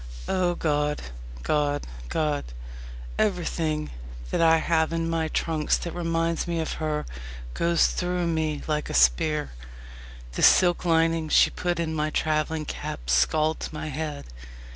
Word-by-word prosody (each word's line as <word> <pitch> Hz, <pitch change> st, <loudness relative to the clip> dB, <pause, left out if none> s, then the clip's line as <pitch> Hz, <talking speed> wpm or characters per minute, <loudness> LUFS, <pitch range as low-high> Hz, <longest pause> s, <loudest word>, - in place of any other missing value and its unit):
O 180 Hz, -1 st, +1 dB
God! 150 Hz, -2 st, 0 dB, 0.4 s
God! 145 Hz, -, 0 dB, 0.2 s
God! 150 Hz, -2 st, 0 dB, 0.8 s
Everything 165 Hz, -6 st, 0 dB, 0.4 s
that -, -, +1 dB
I 165 Hz, 0 st, +6 dB
have 160 Hz, 0 st, +1 dB
in 165 Hz, 0 st, -1 dB
my 165 Hz, -1 st, 0 dB
trunks 155 Hz, -1 st, 0 dB
that 170 Hz, -, -5 dB
reminds 165 Hz, -1 st, -1 dB
me 170 Hz, -1 st, -1 dB
of 160 Hz, -, -2 dB
her 150 Hz, -1 st, -1 dB, 0.5 s
goes 170 Hz, -1 st, +3 dB
through 180 Hz, -1 st, -1 dB
me 160 Hz, -3 st, -1 dB
like 150 Hz, -1 st, -1 dB
a -, -, -3 dB
spear. 65 Hz, -, +3 dB, 0.8 s
The -, -, -4 dB
silk 175 Hz, -1 st, +5 dB
lining 165 Hz, -1 st, +2 dB
she -, -, +5 dB
put 175 Hz, -2 st, -2 dB
in 160 Hz, -1 st, -1 dB
my 155 Hz, 0 st, 0 dB
travelling 155 Hz, 0 st, 0 dB
cap -, -, -5 dB
scalds 155 Hz, -, +2 dB
my 155 Hz, 0 st, -5 dB
head. 150 Hz, -, -4 dB
160 Hz, 140 wpm, -26 LUFS, 150-165 Hz, 0.8 s, I